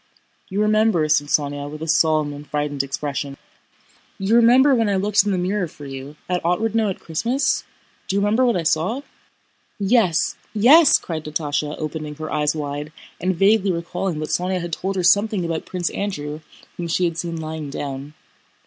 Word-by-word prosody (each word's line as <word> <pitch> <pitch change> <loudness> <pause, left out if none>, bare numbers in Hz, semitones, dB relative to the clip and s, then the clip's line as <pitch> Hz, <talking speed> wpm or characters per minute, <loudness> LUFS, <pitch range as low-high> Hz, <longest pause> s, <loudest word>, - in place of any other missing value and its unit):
"You 200 +2 0
remember," 215 -6 +3
said 150 -1 +3
Sónya 145 -1 -1
with 155 +1 -7
a - - -5
solemn 155 -2 +2
and 145 +1 -10
frightened 145 -1 -1
expression. 140 0 -4 0.8
"You 195 +4 +1
remember 250 +4 +6
when 225 -4 +2
I 200 - +1
looked 200 +1 +3
in 205 - -1
the 190 - 0
mirror 185 +1 -1
for 145 -2 -12
you... 135 +1 -8
at 180 -1 -1
Otrádnoe 215 +5 +1
at 190 - -4
Christmas? 235 - -1 0.4
Do 190 - -1
you - - +3
remember 210 +5 +2
what 240 -2 +3
I 170 - -2
saw?" 170 - 0 0.8
"Yes, 200 -5 +2 0.2
yes!" 280 +9 +7
cried 160 -3 -5
Natásha 150 -1 -2
opening 155 -1 -5
her 155 +1 -6
eyes 150 0 +1
wide, 145 0 -4 0.3
and 185 +1 0
vaguely 195 +2 +3
recalling 175 0 -3
that 155 - -4
Sónya 185 +1 0
had 170 -1 -5
told 195 +4 -2
her 185 - -1
something 200 +1 +3
about 165 -1 -3
Prince 180 -2 -2
Andrew 150 -7 -4 0.4
whom 175 - -3
she 175 +2 +1
had 170 -1 -1
seen 170 -1 -3
lying 160 -2 -5
down. 140 +1 -6
170 Hz, 180 wpm, -21 LUFS, 150-200 Hz, 0.8 s, yes